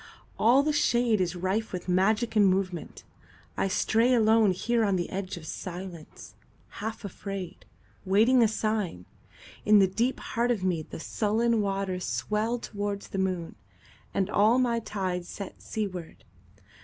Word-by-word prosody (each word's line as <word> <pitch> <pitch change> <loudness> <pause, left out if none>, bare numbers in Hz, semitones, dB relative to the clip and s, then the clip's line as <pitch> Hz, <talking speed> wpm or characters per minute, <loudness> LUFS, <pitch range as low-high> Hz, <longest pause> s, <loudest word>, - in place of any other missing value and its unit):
All 250 +5 +5
the 305 +1 +1
shadeIs 225 - +1
rife 195 +5 -1
with 180 -1 -5
magic 210 +6 +2
and 205 -2 +6
movement. 185 -2 -2 0.5
I - - 0
stray 225 +5 +2
aloneHere 225 -1 +3
on 200 -3 +2
the 175 -2 -2
edge 190 -1 -4
of 165 - -10
silence, 175 0 -8 0.5
half 220 0 -5
afraid, 195 -2 -7 0.4
Waiting 220 +7 +4
a 230 - +6
sign. 215 - -2 0.6
In 210 0 +6
the 195 - +6
deep 230 +7 -1
heart 235 +1 -1
of 235 -5 +1
meThe 175 -5 -2
sullen 220 +5 +1
waters 195 -2 -2
swell 220 +3 -1
towards 205 -3 -4
the 195 - -3
moon, 185 -3 -2 0.6
And 190 - 0
all 215 +3 +4
my 240 -2 +2
tides 185 -5 -3
set 200 -2 -8
seaward. 185 -6 -5
200 Hz, 140 wpm, -28 LUFS, 185-225 Hz, 0.6 s, and